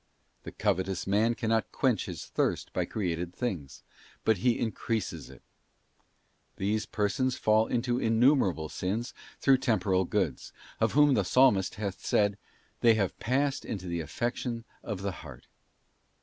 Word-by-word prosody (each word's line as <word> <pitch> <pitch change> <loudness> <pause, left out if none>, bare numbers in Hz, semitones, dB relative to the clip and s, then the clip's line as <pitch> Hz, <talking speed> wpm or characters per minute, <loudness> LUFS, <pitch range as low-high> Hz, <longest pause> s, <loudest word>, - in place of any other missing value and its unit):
'f - - -42
The - - -6
covetous 95 0 -1
man 110 +4 +2
cannot 110 -4 0
quench - - +1
his - - -6
thirst - - -1
by - - 0
created 90 -3 -3
things; 90 - -4 0.4
but 110 -2 +4
he 120 +6 +2
increases 110 -2 -3
it. - - -15 1.1
These 105 +2 -1
persons 110 +5 0
fall 110 +1 +3
into 120 0 0
innumerable 115 - +3
sins 95 - -3 0.3
through 135 -2 +4
temporal 95 -7 +1
goods; 85 -9 -2 0.3
of - - +1
whom 145 -1 +5
the 105 - +2
Psalmist 100 -3 +3
hath 100 -3 -5
said, 100 -1 +2 0.2
' - - -37
They 115 -1 +6
have 100 -4 -1
passed 135 +4 0
into 95 -4 -5
the 85 -1 -2
affection 120 - -3 0.2
of 100 -4 -5
the 100 - -1
heart. 65 -6 -11
105 Hz, 150 wpm, -29 LUFS, 95-120 Hz, 1.1 s, They